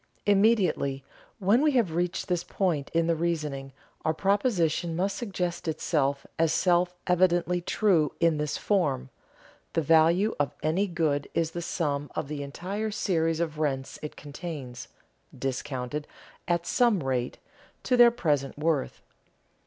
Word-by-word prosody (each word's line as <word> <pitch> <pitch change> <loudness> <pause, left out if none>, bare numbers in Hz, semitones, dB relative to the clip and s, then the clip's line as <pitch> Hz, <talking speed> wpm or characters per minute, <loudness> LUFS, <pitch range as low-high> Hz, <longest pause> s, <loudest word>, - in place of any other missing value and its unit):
Immediately, 195 -10 +2 0.3
when 205 +7 +3
we 300 -1 +3
have 225 -10 +2
reached 175 +2 -1
this 175 -2 0
point 170 -9 -1
in 165 0 +2
the 165 0 +2
reasoning, 150 -5 -2 0.3
our 160 - +1
proposition 180 -5 +1
must 190 +3 0
suggest 180 -7 -3
itself 140 -3 0
as 165 -1 +3
self 180 0 +2
evidently 180 0 +2
true 170 -5 +2
in 165 -2 +3
this 150 -1 -1
form: 140 -10 0 0.6
the 165 - +2
value 165 +7 +4
of 145 -3 0
any 170 +7 +1
good 155 -5 -1
is 165 -1 +1
the 175 - -4
sum 145 -4 -2
of 140 - -3
the 150 -1 -4
entire 190 +10 -4
series 165 -6 0
of 155 -3 -2
rents 135 -3 -2
it 150 - -6
contains, 140 -5 -7 0.5
discounted, 135 +1 -3 0.4
at 170 0 0
some 230 - +2
rate, 130 -2 -1 0.5
to 255 - +2
their 240 -1 +8
present 150 - -1
worth. 155 -2 -1
165 Hz, 140 wpm, -27 LUFS, 145-185 Hz, 0.6 s, their